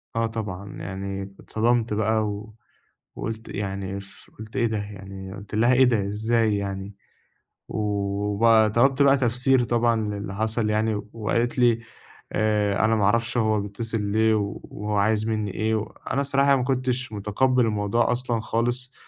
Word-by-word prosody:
آه 115 - +2
طبعًا 100 -3 -5
يعني 95 +1 -5
اتصدمت 115 0 0
بقى 110 +1 +1
و 105 +1 -6 0.6
وقُلت 110 0 -5
يعني 100 -1 -4
ف 100 - -15
قُلت 110 +3 -10
"إيه 120 - +2
ده!" 110 -1 -2
يعني 95 -2 -7
قُلت 100 +1 -8
لها: 120 +3 +4
"إيه 130 +1 +6
ده! 110 -5 +1
إزاي 110 0 +1
يعني؟!" 100 0 -4 0.8
و - - -4 0.6
وبقى 110 0 +5
طلبت 135 +4 +3
بقى 140 0 +6
تفسير 125 +1 +2
طبعًا 120 -1 +2
للي 100 -1 -5
حصل 110 +1 0
يعني 110 -1 0
وقالت 115 +3 -1
لي: 120 -2 +4 0.5
"آآ، 105 -1 +2
أنا 110 +1 +3
ما 105 - +1
أعرفش 115 +3 +1
هو 110 -2 +2
بيتصل 110 +2 -4
ليه 110 +2 +2
و 100 -1 -2
وهو 105 0 -4
عايز 110 +2 +2
مني 105 -3 -1
إيه 110 0 0
و"، 110 - 0 0.3
أنا 140 - +1
الصراحة 140 0 +3
ما 130 - 0
كُنتش 130 -1 -1
متقبّل 120 +5 +2
الموضوع 105 +2 +1
أصلًا 120 -2 -1
خالص 120 +3 0
110 Hz, 160 wpm, -24 LUFS, 100-120 Hz, 0.8 s, إيه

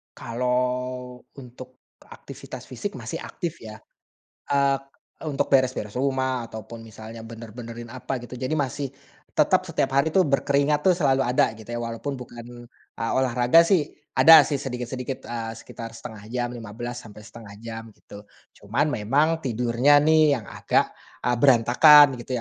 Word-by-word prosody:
Kalau 125 +1 -2 0.2
untuk 130 0 -14
aktivitas - - -11
fisik - - -5
masih - - -6
aktif 170 -1 -6
ya, 110 -1 -9 0.7
eee, 140 -1 +3 0.4
untuk 150 -3 -1
beres-beres 130 -6 +1
rumah 130 -2 -1
ataupun 115 +1 -9
misalnya 110 +1 -10
bener-benerin 115 +1 -9
apa 130 0 -4
gitu 120 +1 -10
jadi 130 +1 -4
masih, 140 0 -2 0.5
tetap - - +4
setiap 135 0 -1
hari 140 +4 +3
itu 190 - +1
berkeringat 140 +2 +1
tuh 185 - +5
selalu 135 -3 +2
ada 120 -2 +2
gitu 110 +1 -12
ya 120 - -3
walaupun 120 +4 -5
bukan 120 0 -11 0.3
a 115 - -1
olahraga 130 +5 +4
sih 170 -3 +2 0.3
ada 160 -2 +9
sih 140 +1 -2
sedikit-sedikit, 125 0 -5
eee, 115 -1 -5
sekitar 115 0 -10
1/2 110 -2 -10
jam 120 +1 -2
15 120 +1 -7
sampai 105 -3 -12
1/2 110 -1 -12
jam 115 -1 -8
gitu, 100 0 -14 0.3
cuman 135 +9 -1
memang 140 +9 +1
tidurnya 125 +2 +3
nih 155 -1 +4
yang 115 -5 -6
agak, - - 0 0.3
eee, 125 0 +1
berantakan 135 +2 +6
gitu 125 +2 -5
125 Hz, 145 wpm, -24 LUFS, 115-140 Hz, 0.7 s, ada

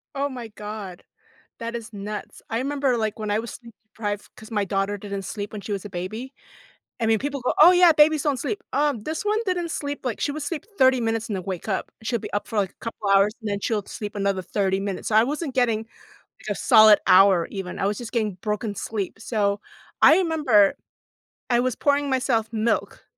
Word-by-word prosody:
Oh 280 +1 0
my 245 -4 -7
god. 210 -3 -8 0.6
That 230 0 -5
is 230 -1 -6
nuts. 205 +1 -7
I 225 - 0
remember, 275 -1 0
like, 220 -1 -2
when 215 -1 -3
I 205 - +2
was 235 - -7
sleep-deprived, 220 -3 -7
'cause 220 - -13
my 210 -2 0
daughter 195 +1 -1
didn't 200 -1 -5
sleep 205 +1 -6
when 210 - -6
she 205 - -6
was 200 0 -3
a 205 - -8
baby 215 +9 -5 0.7
I 225 - 0
mean, 220 0 +4
people 280 +1 -3
go, 250 - 0
"Oh, 340 +4 +10
yeah. 355 -1 +7
Babies 305 -1 +4
don't 285 -4 0
sleep." 430 - -3
Um, 285 -4 +1
this 315 +5 -4
one 420 +1 +2
didn't 355 -3 -1
sleep 285 -1 -4
like, 240 -4 -3
she 290 - 0
would 300 0 -5
sleep 320 0 -4
30 260 -1 +5
minutes 225 0 -1
and 210 - -3
then 185 - -4
wake 185 0 -5
up. 195 -3 -2
She'll 235 +1 -1
be - - -8
up 205 - -2
for 220 - -4
like 195 -2 +2
a - - -38
couple 220 -3 -5
hours, 195 +1 +4
and 215 - -4
then 200 0 -1
she'll 215 -1 -1
sleep 210 -2 -7
another 200 -1 0
30 195 -1 0
minutes. 195 -1 -4
So 215 - +1
I 220 - +7
wasn't 295 +1 -3
getting 225 -3 +1 0.6
a - - 0
solid 215 -1 +7
hour, 185 -2 +6
even. 190 -3 -6
I - - +1
was 205 +1 -1
just 240 -1 -7
getting 215 -5 0
broken 210 +2 -3
sleep. 205 -1 -4
So 205 -3 -1 0.4
I 320 - +8
remember 295 - +3 0.7
I 240 -1 +4
was 255 -1 0
pouring 285 0 +1
myself 250 -4 +1
milk, 225 +1 -1
220 Hz, 215 wpm, -24 LUFS, 205-265 Hz, 0.7 s, Oh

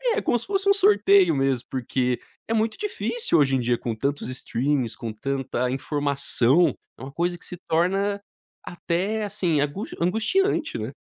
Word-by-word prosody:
É 440 - 0
como 240 - +1
se - - -6
fosse 395 0 0
um - - +7
sorteio 400 - +4
mesmo, 135 -2 0
porque 125 -1 -1 0.3
é 225 - -1
muito 220 0 0
difícil, 235 - 0
hoje 135 -2 +3
em - - +1
dia, 120 0 +1
com 115 -2 -4
tantos 140 +1 -2
streamings, 130 0 -1
com 115 -2 -6
tanta 130 +1 -2
informação, 140 +2 +2 0.2
é - - -15
uma 135 +1 -7
coisa 175 +3 -1
que - - -14
se 180 - -7
torna 195 +5 +1 0.4
até, 185 +5 -2
assim, 190 -7 0
angu 150 +9 -2
angustiante, 225 - +1
né? - - -5
165 Hz, 170 wpm, -24 LUFS, 135-215 Hz, 0.4 s, um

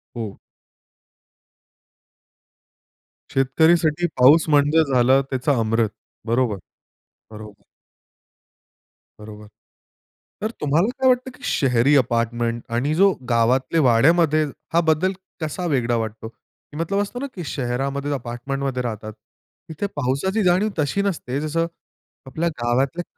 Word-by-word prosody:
हो. 110 -4 -6 3.0
शेतकरीसाठी 160 +5 +2
पाऊस 150 +6 +7
म्हणजे 150 +2 +4
झालं 130 +2 +4
त्याचा 130 +1 0
अमृत. 115 0 +1 0.4
बरोबर. 115 -3 +1 0.7
बरोबर. 105 -2 -12 1.6
बरोबर. 105 0 -11 0.9
तर 215 +2 -2
तुम्हाला 155 +7 +2
काय 260 - +3
वाटतं 255 +1 +1
की - - -19
शहरी 130 +1 +2
अपार्टमेंट 120 -1 0
आणि 145 +5 0
जो 195 +2 +5 0.2
गावातल्या 130 +7 +2
वाड्यामध्ये 155 +6 +4 0.3
हा 170 - +4
बद्दल 185 +5 +2 0.3
कसा 160 +3 -3
वेगळा 120 -2 +1
वाटतो? 110 0 -5
की 145 +5 -18
मतलब 195 +5 -1
असतं 205 +4 -5
ना 280 - -4
की 175 - -6
शहरामध्ये 135 +2 -3
अपार्टमेंटमध्ये 130 +1 -4
राहतात. 110 -2 -5 0.6
तिथे 160 +6 -3
पावसाची 145 - -1
जाणीव 185 +4 +3
तशी 150 +7 0
नसते 155 -9 -2
जसं 165 +2 -1 0.6
आपल्या 165 +5 -1
गावातल्या 130 +8 0
140 Hz, 110 wpm, -22 LUFS, 120-165 Hz, 3.0 s, पाऊस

